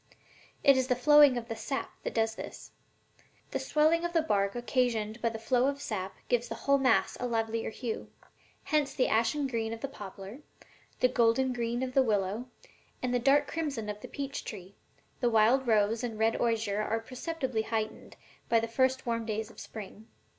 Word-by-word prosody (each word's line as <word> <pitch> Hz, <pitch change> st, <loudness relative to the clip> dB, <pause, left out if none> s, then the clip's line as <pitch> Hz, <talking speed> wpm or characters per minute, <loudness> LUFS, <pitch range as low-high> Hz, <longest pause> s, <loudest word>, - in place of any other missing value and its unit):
It 275 Hz, -1 st, +7 dB
is 260 Hz, -1 st, +1 dB
the 250 Hz, -, +2 dB
flowing 290 Hz, 0 st, +6 dB
of 235 Hz, -1 st, -5 dB
the 225 Hz, -, -4 dB
sap 270 Hz, +4 st, -4 dB
that -, -, -5 dB
does 225 Hz, -1 st, +1 dB
this. -, -, -9 dB, 0.8 s
The -, -, -1 dB
swelling 315 Hz, +2 st, +2 dB
of 345 Hz, 0 st, -2 dB
the 330 Hz, -2 st, +3 dB
bark 200 Hz, -7 st, +1 dB
occasioned 240 Hz, -3 st, -1 dB
by 230 Hz, -, +2 dB
the 225 Hz, -, -6 dB
flow 245 Hz, +3 st, +2 dB
of 280 Hz, 0 st, -1 dB
sap 190 Hz, -6 st, -4 dB
gives 240 Hz, -1 st, +1 dB
the -, -, -5 dB
whole 280 Hz, 0 st, +2 dB
mass 255 Hz, -4 st, +2 dB
a 250 Hz, -, -1 dB
livelier 225 Hz, -1 st, -1 dB
hue; 225 Hz, 0 st, -5 dB, 0.5 s
hence 300 Hz, -3 st, 0 dB
the 260 Hz, -, +2 dB
ashen 230 Hz, +6 st, +1 dB
green 230 Hz, -4 st, -2 dB
of 225 Hz, -, -8 dB
the -, -, -2 dB
poplar, 200 Hz, -1 st, -9 dB, 0.6 s
the 255 Hz, -, +6 dB
golden 250 Hz, +1 st, +2 dB
green 240 Hz, +1 st, -2 dB
of 255 Hz, -1 st, -4 dB
the 270 Hz, -, +5 dB
willow 210 Hz, 0 st, 0 dB, 0.6 s
and 250 Hz, -1 st, 0 dB
the 245 Hz, -, +2 dB
dark 275 Hz, +3 st, +4 dB
crimson 285 Hz, -10 st, -3 dB
of 210 Hz, 0 st, -5 dB
the -, -, -7 dB
peach 280 Hz, 0 st, -5 dB
tree, 190 Hz, -2 st, -8 dB, 0.5 s
the 245 Hz, -, +2 dB
wild 235 Hz, +4 st, +4 dB
rose 220 Hz, +1 st, +2 dB
and 235 Hz, -2 st, -3 dB
the -, -, -9 dB
red 225 Hz, +1 st, +2 dB
osier 220 Hz, -3 st, +1 dB
are 225 Hz, +1 st, -1 dB
perceptibly 255 Hz, 0 st, -3 dB
heightened 220 Hz, -1 st, -4 dB, 0.3 s
by 230 Hz, -, +5 dB
the 230 Hz, -, -2 dB
first 260 Hz, +3 st, +1 dB
warm 230 Hz, -1 st, -1 dB
days 220 Hz, 0 st, -3 dB
of -, -, -14 dB
spring." 215 Hz, 0 st, -9 dB
235 Hz, 195 wpm, -30 LUFS, 220-265 Hz, 0.8 s, It